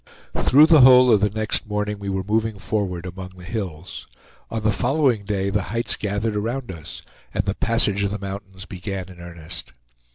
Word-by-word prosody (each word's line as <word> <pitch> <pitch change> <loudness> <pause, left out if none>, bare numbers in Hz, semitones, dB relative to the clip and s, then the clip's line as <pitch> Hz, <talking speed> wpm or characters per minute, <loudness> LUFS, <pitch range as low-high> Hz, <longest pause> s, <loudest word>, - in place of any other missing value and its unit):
Through 145 +4 +6
the 160 -3 +6
whole 125 -1 +8
of 105 - +4
the 105 - +3
next 110 +2 -1
morning 105 0 -2
we 100 -1 -5
were 95 -1 -2
moving 110 +1 0
forward, 95 -4 -2
among 90 +1 -8
the 90 - -12
hills. 90 -5 -6 0.4
On 115 - -2
the 110 - +3
following 125 -2 +1
day 100 -1 -1
the 105 - +1
heights 115 +1 +1
gathered 105 +1 -2
around 115 +2 -3
us, 80 -3 -10 0.3
and - - 0
the 100 - 0
passage 105 -3 +1
of 100 - +1
the 105 - -3
mountains 95 -1 -8
began 95 0 -6
in 90 -1 -13
earnest. 85 -4 -8
100 Hz, 190 wpm, -22 LUFS, 95-110 Hz, 0.4 s, whole